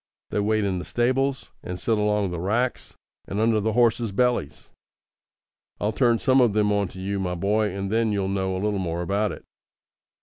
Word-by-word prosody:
They - - 0
wait 110 +1 +1
in 95 -2 -1
the - - -5
stables, 130 +3 0
and 90 0 -6
sit 115 -4 +1
along 105 -2 +1
the 85 - -4
racks 115 +8 -1 0.3
and 100 - -3
under 110 0 +3
the 110 +1 -1
horses' 115 -1 +2
bellies. 100 - -1 1.1
I'll 105 - 0
turn 120 +1 +3
some 130 +2 +3
of 110 -4 +2
'em 105 -1 +3
on 100 -1 +1
to 95 - -11
you, 100 +1 -2
my 90 -2 -2
boy, 105 +4 +1
and 100 +1 -4
then 115 0 +2
you'll 100 -2 0
know 95 -1 -1
a 95 - -3
little 105 -2 0
more 85 -1 -2
about 100 +3 0
it." - - -9
105 Hz, 200 wpm, -24 LUFS, 95-115 Hz, 1.1 s, under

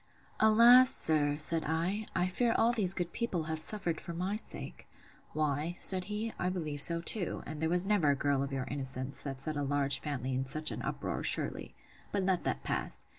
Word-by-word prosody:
Alas! 235 +4 +7
sir, 145 -2 +3
said 160 +1 +3
I, 170 +7 -2
I 180 -1 +1
fear 230 +6 -1
all 235 +1 +3
these 195 -5 +4
good 175 -2 -4
people 190 -8 -2
have 160 0 -3
suffered 170 -1 -3
for 170 - -8
my 185 +4 -3
sake!—Why, 155 -6 -5
said 185 -1 +2
he, 215 +2 -4
I 180 - -1
believe 155 -6 -4
so 170 +2 +4
too; 180 +1 +1
and 155 -1 -8
there 160 - 0
was 180 +2 +3
never 195 -7 +1
a 140 - +2
girl 140 0 -1
of 140 0 -4
your 135 -2 -4
innocence, 130 -1 -2
that 135 -2 -6
set 155 +3 -5
a 145 - -3
large 140 -1 +1
family 130 -3 -5
in 130 +1 -2
such 155 +3 +2
an - - -6
uproar, - - -5
surely.—But 200 -2 -4
let 185 -2 0
that - - -2
pass. - - -3
165 Hz, 195 wpm, -31 LUFS, 145-195 Hz, -, Alas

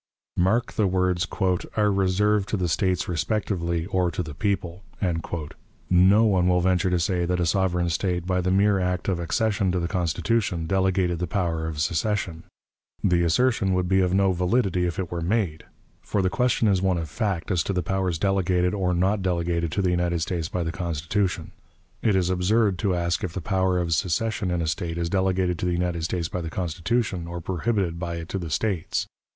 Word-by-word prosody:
Mark 110 +8 +1
the 105 - +2
words, 90 -2 +1 0.5
"are 105 -1 +3
reserved 100 +1 +2
to 105 - 0
the 90 -2 0
States 95 +2 0
respectively, 85 -2 -1
or 95 -2 +1
to 90 +2 -3
the 75 -2 -7
people." 95 +1 -2 1.1
No 95 +5 +6
one 95 -5 +3
will 90 0 +3
venture 90 +1 +2
to 90 - +2
say 90 0 0
that 90 +1 0
a 85 - +2
sovereign 90 0 +1
State, 90 0 -1
by 90 0 +1
the 90 - 0
mere 100 +1 +3
act 90 0 -1
of 95 -3 0
accession 100 +3 0
to 90 - 0
the 85 - -1
Constitution, 90 0 0
delegated 95 -1 +1
the 90 - -2
power 85 -3 -1
of 80 -2 -5
secession. 85 +2 -1 0.6
The 90 -3 +3
assertion 95 +2 +2
would 90 -1 0
be 95 +1 +3
of 90 -1 +1
no 95 0 +3
validity 90 0 +1
if 85 - -4
it 90 -3 -3
were 85 -1 -3
made; 90 -3 -1 0.4
for 100 - -1
the 95 - +1
question 125 -3 +2
is 95 -3 +2
one 95 -2 +1
of 80 -1 -3
fact 100 - -2
as 90 -3 +2
to 100 - -2
the 90 -2 -1
powers 95 -2 -1
delegated 90 -1 +1
or 90 -3 0
not 95 +4 +1
delegated 85 -2 -1
to 100 - 0
the 90 - +2
United 85 -1 0
States 85 -2 -3
by 90 - -2
the 80 - -2
Constitution. 90 +2 -2 0.5
It 105 -3 +2
is 95 -1 +2
absurd 95 +1 +2
to 95 -1 +1
ask 85 0 -1
if 90 -3 -3
the - - -3
power 95 +1 +1
of 85 -2 0
secession 95 +5 0
in 90 -1 0
a - - -2
State 85 +1 -2
is 85 0 -2
delegated 95 -2 +1
to 90 - -1
the 90 - +1
United 85 -1 -1
States 85 -1 -1
by 90 - -4
the 80 - -4
Constitution, 90 +2 -2
or 85 +1 -5
prohibited 90 0 -1
by 85 -1 -3
it 85 0 -7
to 95 - -2
the 85 -3 -5
States. 90 +2 -1
90 Hz, 200 wpm, -25 LUFS, 85-95 Hz, 1.1 s, No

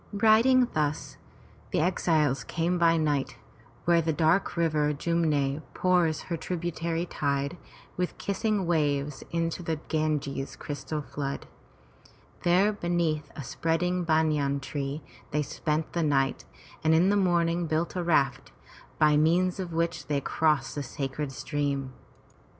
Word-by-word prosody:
Riding 225 +5 +5
thus, 150 -1 -2 0.5
the - - 0
exiles 155 -6 +1
came 175 +5 -1
by 165 -1 +4
night 150 -4 0 0.5
where 170 -1 +4
the 160 0 0
dark 160 +4 +2
river 155 -3 +2
Jum'ne 150 -3 0
pours 175 -4 +2
her 170 - -4
tributary 170 0 -2
tide 140 -1 -1 0.4
with 180 0 -2
kissing 200 0 -1
waves 150 -4 0
into 165 +1 -1
the 165 -2 -1
Ganges' 150 -3 -1
crystal 150 +1 -5
flood. 140 -1 -4 1.0
There 185 +5 +3
beneath 170 -6 -1
a 145 - -6
spreading 175 +6 0
banyan 155 -4 +2
tree 140 +1 -4 0.3
they 150 +1 0
spent 155 +2 -2
the 170 - 0
night 135 -4 +1 0.4
and 160 0 +4
in 175 +4 +4
the - - +3
morning 175 -3 +2
built 160 +3 -1
a 180 - 0
raft, 140 -6 +1 0.5
by 150 -1 +4
means 175 +4 +2
of 180 -2 -4
which 165 +1 -1
they 145 -2 +1
crossed 150 -1 +1
the 145 - -3
sacred 140 +1 -4
stream. 140 -2 -2
160 Hz, 135 wpm, -28 LUFS, 145-175 Hz, 1.0 s, Riding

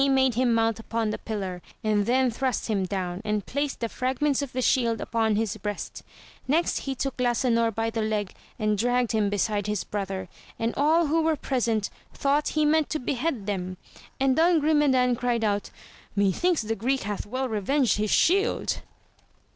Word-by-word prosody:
43 275 -1 +3
made 265 -1 +3
Ilim 245 -1 +2
mount 225 -1 +1
upon 225 -1 -2
the - - -4
pillar, 190 -5 -4 0.2
and 210 -1 +1
then 255 +1 +3
thrust 255 +1 -1
him 195 -3 +1
down, 180 -1 -3
and 210 -2 -1
placed 285 -1 -2
the 230 - 0
fragments 265 +4 0
of 280 -3 -4
the 255 - -3
shield 230 -2 +2
upon 225 -2 0
his 215 -1 -1
breast; 205 0 -5 0.5
next 320 +6 +2
he 270 - -1
took 270 +1 -3
Lasanor 240 -2 +2
by 225 +1 -2
the 225 - -2
leg 215 -2 -1 0.2
and 215 -1 0
dragged 245 +1 +1
him 215 -2 +1
beside 205 0 0
his 210 -2 -1
brother, 195 -2 -4 0.3
and 230 +1 -1
all 320 +4 +3
"who 320 +2 +2
were 320 0 +2
present 235 -7 -1 0.3
thoughtjhe 295 +2 +1
meant 310 0 +3
to 310 - -1
behead 255 -3 -2
them. 185 -2 -3 0.4
And 265 -1 +3
Don 330 +2 +4
Grume 295 -1 +3
dan 250 -1 +3
cried 240 -1 0
out, 205 -1 0 0.5
methinks 220 - +2
the 225 +1 -2
Greek 260 +6 0
hath 205 0 -4
well 260 +4 -2
revenged 235 +4 +1
his 210 0 0
shield 395 - +2
230 Hz, 180 wpm, -26 LUFS, 210-270 Hz, 0.5 s, Don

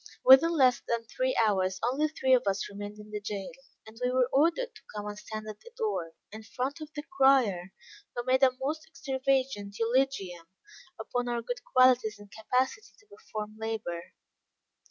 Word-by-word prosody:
Within 320 +6 +8
less 255 -3 +4
than 235 -1 -1
three - - -2
hours, 190 -2 +1
only 270 +6 +1
three 265 -4 +1
of 255 - +6
us 195 0 0
remained 205 +1 -8
in 210 0 -12
the 210 0 -4
jail; 205 +1 -5 0.3
and 220 +1 -13
we 250 - +2
were 255 -1 +2
ordered 335 - +2
to 435 - -15
come 210 0 -4
and 210 0 -5
stand 215 +1 -7
at 215 -1 -8
the - - -14
door, 415 - -2 0.2
in 215 +1 -8
front 260 +7 -4
of 305 - -7
the 295 - -4
crier, 235 - +3 0.4
who 240 - -2
made 260 +1 +2
a 265 - +7
most 310 +4 -3
extravagant 265 -7 -1
eulogium 225 -8 0 0.5
upon 245 0 -2
our 235 -1 -2
good 245 +1 -5
qualities 255 -4 +4
and 205 -1 -15
capacity 255 - -2
to 415 - -24
perform 215 - -7
labor. 200 -6 -5
245 Hz, 175 wpm, -29 LUFS, 210-270 Hz, 0.5 s, Within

